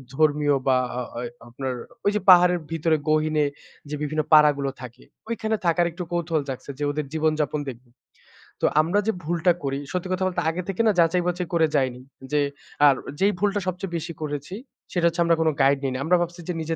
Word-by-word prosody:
ধর্মীয় 145 -1 +3
বা 130 - +5 0.2
আ - - -1 0.2
ওয় 120 0 -4 0.2
আপনার 130 +2 -4 0.3
ওই 205 - +4
যে 210 - +2
পাহাড়ের 180 -1 +7
ভিতরে 165 0 +1
গহিনে 155 -1 +2 0.4
যে 150 - -3
বিভিন্ন 155 +1 0
পাড়াগুলো 145 -2 +5
থাকে। 125 -2 -10 0.3
ঐখানে 220 -1 -1
থাকার 170 +1 +3
একটু 180 +2 -6
কৌতূহল 170 -2 0
জাগছে 135 +1 -6
যে 145 - -2
ওদের 150 0 -3
জীবন 160 0 +2
যাপন 150 0 0
দেখব। 125 0 -10 0.8
তো - - +2 0.2
আমরা 170 +6 +1
যে - - +4
ভুলটা 170 +2 +2
করি 135 0 -2
সত্যি 180 0 -2
কথা 185 +1 -1
বলতে 185 - -2
আগে 170 +3 -2
থেকে 195 - 0
না - - +6
যাচাই 170 +1 +3
বাচাই 180 0 -1
করে 165 -1 +4
যাইনি। 130 -2 0 0.3
যে 150 - +2 0.5
আর 140 - +5 0.2
যেই 200 +2 +4
ভুলটা 205 +1 +1
সবচেয়ে 180 0 -4
বেশি 165 +1 -5
করেছি 145 +3 -4 0.4
সেটা 175 -2 +1
হচ্ছে 170 +1 0
আমরা 170 0 +3
কোন 160 - +3
গাইড 140 +1 +4
নিই 135 - 0
নি। - - -3
আমরা 175 +4 +3
ভাবছি 175 0 -4
যে - - 0
নিজে 165 +1 -2
160 Hz, 205 wpm, -24 LUFS, 145-175 Hz, 0.8 s, পাহাড়ের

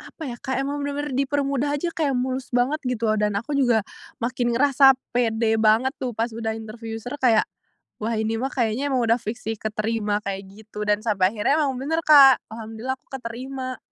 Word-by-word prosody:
apa - - -12
ya, 240 - -6
kayak 265 +1 -2
emang 285 +1 -3
bener-bener 285 0 -3
dipermudah 280 0 0
aja, 340 +4 -2
kayak 295 -5 -1
mulus 255 0 -2
banget, 255 +5 +2
gitu, 230 -3 0
dan 210 -1 +1
aku 235 +9 -3
juga 240 -5 +3 0.4
makin 240 0 0
ngerasa 270 +1 +6 0.2
pede 225 -2 +1
banget 220 +4 +4
tuh, 250 -3 -3
pas 230 +2 -1
udah 225 0 -3
interview 225 +1 -7
user, 245 +6 -7
kayak, 235 -5 +4 0.6
"Wah, 225 +2 -1
ini 220 +1 -1
mah 265 - -2
kayaknya 250 +3 0
emang 255 - +2
udah 230 +1 +3
fiks 225 +3 -5
sih 225 0 -1
keterima", 215 -1 -1
kayak 195 0 -4
gitu 210 +1 -9
dan 210 0 +2
sampai 195 -3 +2
akhirnya 275 +9 +2
memang 265 -2 -2
bener, 320 +3 -1
Kak, 275 -4 +8
Alhamdulillah, 225 +3 -5
aku - - -46
keterima. 255 +2 -6
240 Hz, 190 wpm, -23 LUFS, 220-270 Hz, 0.6 s, Kak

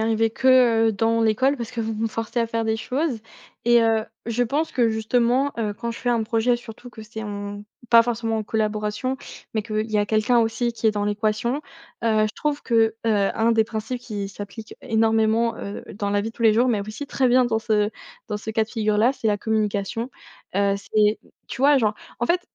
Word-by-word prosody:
arrivé 225 0 +1
que, 245 -2 +4
heu, - - +1
dans 225 +2 +1
l'école 230 +6 +2
parce 235 -2 -5
que 235 - -4
vous 225 0 -2
me 220 +1 -1
forcez 225 +2 -3
à 230 - +1
faire 230 0 -2
des 220 0 0
choses. 260 +3 -2 0.5
Et, 240 0 +5
heu, 225 -1 +2 0.2
je 235 +1 0
pense 290 +7 -1
que 240 -3 +3
justement, 240 +5 +1
heu, 210 -2 -1
quand 235 +3 -4
je 230 - -7
fais 245 - -3
un 235 -2 +2
projet 230 +2 +1
surtout 240 +1 -11
que 220 - -11
c'est 220 +1 -8
en 205 -1 -6 0.3
pas 230 -1 +8
forcément 225 -1 -1
en - - -2
collaboration, 215 +3 -1 0.4
mais 215 -1 -1
qu'il 215 0 -3
y 215 - +1
a 205 - +1
quelqu'un 215 +3 +2
aussi 235 +1 0
qui 230 - -2
est - - +6
dans 205 -1 -2
l'équation, 215 +4 0 0.5
heu, 215 -1 +3
je 215 - -7
trouve 295 -1 -2
que, 225 -2 +2
heu, 205 -3 +2
un 230 +1 +2
des 225 -1 +3
principes 220 +3 -4
qui 205 -5 -5
s'applique 205 +3 -9
é - - -11
énormément, 225 +1 +2
heu, 200 -2 -7
dans 200 0 -2
la 205 0 +2
vie 225 - -3
de - - -23
tous - - -5
les 220 -2 +5
jours 245 +3 +3
mais 220 -4 +1
aussi 215 +8 -6
très 265 -2 +1
bien 250 +1 +5
dans 230 -2 +1
ce 215 -2 +1 0.4
dans 210 - -2
ce 220 - -6
cas 220 0 +1
de - - -22
figure-là 215 +2 +2
c'est 235 - -4
la 205 - +2
communication. 215 +2 -1 0.5
Heu, 200 0 +3
c'est 210 +1 +1
mmh, - - -24 0.2
tu - - -6
vois, 290 +1 +6
genre, 215 -3 +1 0.3
en 240 - +1
fait, 355 +6 +2
225 Hz, 230 wpm, -23 LUFS, 215-235 Hz, 0.5 s, pas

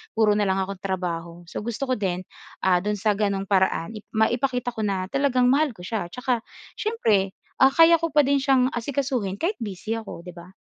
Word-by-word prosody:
puro 220 -2 +4
na 205 -1 +1
lang 190 0 +1
akong 195 0 -6
trabaho. 175 -3 -4
So - - -5
gusto 235 +4 -3
ko - - +3
din, 185 -2 -1 0.4
ah, 180 -1 +4
do'n 210 +1 0
sa 215 +1 +2
gano'ng 200 -1 0
paraan 190 +1 +1
ip 210 - -12
maipakita 245 +2 +1
ko 220 - -2
na 190 -2 -2
talagang 255 -2 +2
mahal 290 0 +3
ko 180 - -14
siya. 210 0 -3
Tsaka 250 -1 -1 0.3
siyempre, 215 - +1 0.2
ah, 265 +1 +6
kaya 330 +2 +7
ko 330 0 -2
pa 300 - +6
din 280 0 +2
siyang 265 -2 +3
asikasuhin 245 -5 -2
kahit 380 +6 0
busy 210 0 -4
ako, 220 -6 -8
'di 180 0 -11
ba? 175 +2 -11
220 Hz, 205 wpm, -24 LUFS, 190-260 Hz, 0.4 s, kaya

